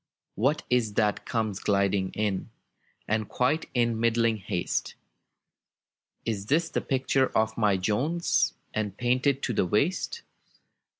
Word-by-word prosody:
what 135 Hz, +9 st, +1 dB
is 115 Hz, -4 st, +1 dB
that 105 Hz, -2 st, +1 dB
comes 110 Hz, -4 st, -1 dB
gliding 100 Hz, -1 st, +1 dB
in, 105 Hz, -3 st, -1 dB, 0.6 s
And 110 Hz, -1 st, 0 dB
quite 130 Hz, +6 st, 0 dB
in 115 Hz, -2 st, +2 dB
middling 115 Hz, -1 st, +2 dB
haste? 90 Hz, -3 st, -2 dB, 1.3 s
It 105 Hz, 0 st, -3 dB
is 165 Hz, +2 st, +2 dB
the -, -, 0 dB
picture 135 Hz, 0 st, +1 dB
of 110 Hz, 0 st, +1 dB
my 105 Hz, -4 st, +2 dB
Jones, 125 Hz, -, +1 dB, 0.2 s
And 105 Hz, -2 st, -2 dB
painted 130 Hz, +3 st, +1 dB
to 125 Hz, -, 0 dB
the 95 Hz, -, +1 dB
waist. 175 Hz, -, 0 dB
110 Hz, 125 wpm, -27 LUFS, 105-130 Hz, 1.3 s, in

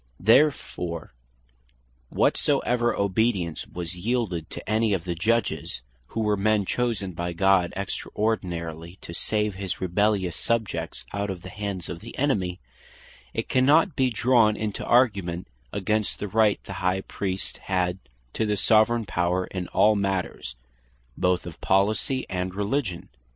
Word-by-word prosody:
Therefore 90 Hz, -, +2 dB, 1.0 s
whatsoever 120 Hz, -1 st, +2 dB
obedience 100 Hz, -4 st, 0 dB
was 85 Hz, 0 st, -4 dB
yeelded 100 Hz, -6 st, -1 dB
to -, -, -8 dB
any 110 Hz, 0 st, +2 dB
of 90 Hz, -4 st, -1 dB
the 90 Hz, -1 st, -2 dB
Judges, 90 Hz, -, -1 dB, 0.2 s
(who 115 Hz, -, -3 dB
were 105 Hz, -1 st, +2 dB
men 105 Hz, 0 st, +2 dB
chosen 115 Hz, -4 st, -1 dB
by 85 Hz, 0 st, -3 dB
God 95 Hz, 0 st, +3 dB
extraordinarily, 90 Hz, -5 st, -3 dB
to 85 Hz, -, -8 dB
save 105 Hz, +4 st, 0 dB
his 95 Hz, -1 st, -4 dB
rebellious 95 Hz, -1 st, +1 dB
subjects 115 Hz, -3 st, -2 dB
out 100 Hz, +1 st, -2 dB
of 90 Hz, -2 st, -5 dB
the 95 Hz, -, -8 dB
hands 100 Hz, -3 st, -4 dB
of 85 Hz, -, -6 dB
the 115 Hz, +5 st, -10 dB
enemy,) 95 Hz, -10 st, 0 dB, 0.8 s
it -, -, -2 dB
cannot 150 Hz, +7 st, +4 dB
bee 130 Hz, -1 st, +3 dB
drawn 115 Hz, -2 st, +3 dB
into 105 Hz, -2 st, -3 dB
argument 100 Hz, -8 st, +2 dB, 0.2 s
against 105 Hz, +2 st, -1 dB
the 105 Hz, -, -4 dB
Right 105 Hz, 0 st, +3 dB
the 95 Hz, -, -7 dB
High 95 Hz, +1 st, +1 dB
Priest 95 Hz, -1 st, -2 dB
had 90 Hz, -1 st, -1 dB, 0.3 s
to 110 Hz, -, 0 dB
the 105 Hz, -1 st, 0 dB
Soveraign 110 Hz, +2 st, +4 dB
Power, 90 Hz, 0 st, 0 dB
in 90 Hz, -1 st, -5 dB
all 105 Hz, +2 st, +4 dB
matters, 95 Hz, -10 st, -2 dB, 0.6 s
both 90 Hz, -1 st, +1 dB
of 85 Hz, -3 st, -9 dB
Policy 110 Hz, +7 st, +1 dB
and 90 Hz, 0 st, -3 dB
Religion. 100 Hz, -3 st, -2 dB
100 Hz, 140 wpm, -25 LUFS, 90-110 Hz, 1.0 s, cannot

